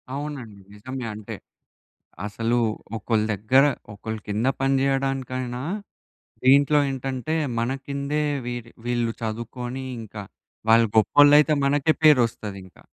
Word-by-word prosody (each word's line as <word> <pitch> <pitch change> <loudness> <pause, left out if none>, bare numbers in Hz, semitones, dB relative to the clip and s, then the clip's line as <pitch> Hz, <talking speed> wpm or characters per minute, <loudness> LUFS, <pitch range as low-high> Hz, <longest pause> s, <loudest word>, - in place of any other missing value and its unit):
అవునండి. 130 -9 -6
నిజమే. 130 +4 -6
అంటే 105 -1 -7 0.9
అసలు 115 +3 -1 0.4
ఒకళ్ళ 110 0 0
దగ్గర 130 +8 +4 0.3
ఒకళ్ళ 110 +2 -5
కింద 105 +5 0
పనిచేయడానికైనా 135 -2 0 0.8
దీంట్లో 140 +2 +6
ఏంటంటే, 135 +3 -3 0.3
మన 120 +2 0 0.2
కిందే 140 +2 -2 0.2
వీ 120 0 -3 0.3
వీళ్ళు 120 -1 0
చదువుకొని 120 +3 -5 0.2
ఇంకా 105 -2 -8 0.5
వాళ్ళు 115 0 +6
గొప్పోళ్ళైతే 145 +7 +6
మనకే 145 +3 +3
పేరొస్తది 115 -8 +3
ఇంకా. 95 - -19
125 Hz, 100 wpm, -24 LUFS, 115-135 Hz, 0.9 s, దీంట్లో